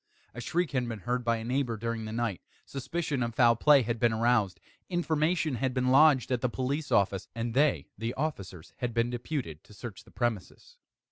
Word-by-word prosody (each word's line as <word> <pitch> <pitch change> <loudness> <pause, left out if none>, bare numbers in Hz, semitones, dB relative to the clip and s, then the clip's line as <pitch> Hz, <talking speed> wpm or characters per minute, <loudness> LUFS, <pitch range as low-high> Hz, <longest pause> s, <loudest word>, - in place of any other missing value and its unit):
A 120 - -7
shriek 175 +6 -1
had 125 -3 -1
been 110 -3 -6
heard 125 +3 -1
by 115 -1 +1
a 110 - -6
neighbour 125 -1 -1
during 115 0 -3
the 110 - -5
night; 115 -4 -2 0.2
suspicion 140 0 -3
of 115 -2 -2
foul 120 -2 +5
play 140 +2 +5
had 115 0 -2
been 120 0 +3
aroused; 110 -4 +2 0.3
information 160 -4 0
had 130 +2 -1
been 125 0 +1
lodged 135 -1 +5
at 125 -2 +1
the 125 - +1
police 140 +5 -2
office, 100 -1 +2
and 115 0 -3
they 145 +3 +2
(the 115 +2 -3
officers) 100 - -5
had 120 -2 -3
been 115 +1 +1
deputed 120 - -4
to 105 - -17
search 105 -5 -8
the - - -19
premises. 120 - -4
120 Hz, 200 wpm, -29 LUFS, 115-140 Hz, 0.3 s, foul